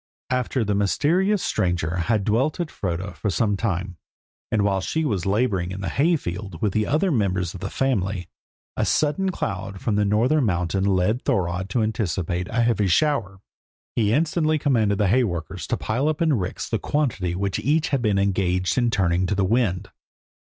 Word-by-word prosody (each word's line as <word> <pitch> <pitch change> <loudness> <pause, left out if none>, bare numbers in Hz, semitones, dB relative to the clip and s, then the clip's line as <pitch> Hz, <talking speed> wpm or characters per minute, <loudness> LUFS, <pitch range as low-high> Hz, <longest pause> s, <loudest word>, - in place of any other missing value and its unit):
After 125 -1 0
this 105 0 0
mysterious 175 - +2
stranger 90 -2 0
had 105 +4 +1
dwelt 125 - +1
at 170 -3 -2
Froda 95 +1 -3
for 105 - -3
some 105 +1 +1
time, 95 -3 -2 0.5
and 110 -2 +2
while 95 -1 +1
she 160 +11 -1
was 100 - -1
labouring 100 -4 +1
in 95 +1 -6
the 95 - -2
hay 165 +6 +2
field 95 - -5
with 105 -5 -1
other 160 - +1
members 95 - 0
of 95 - -8
the - - -4
family, 100 -9 -1 0.5
a - - 0
sudden 155 +6 +1
cloud 100 - -4
from 105 -1 -1
the 105 - +3
northern 120 +9 +2
mountain 90 -2 0
led 100 +5 +1
Thorodd 90 0 -1
to 110 +4 +1
anticipate 95 -5 -2
a 120 0 +1
heavy 115 -4 +2
shower. 100 - +1 0.5
He 105 -3 +2
instantly 155 +3 +2
commanded 115 -9 +1
the 105 - +2
hay 125 +7 +4
workers 85 -7 -4
to - - -1
pile 125 +7 -1
up 155 -1 0
in 160 -2 +3
ricks 95 -7 -2
the - - -1
quantity 105 - -1
which 100 +1 -1
each 150 +8 +1
had 135 -3 0
been 105 -4 +1
engaged 95 -2 +1
in 120 -1 +2
turning 90 -4 +1
to 105 - 0
the 95 0 +1
wind. 100 -4 0
105 Hz, 185 wpm, -23 LUFS, 95-130 Hz, 0.5 s, hay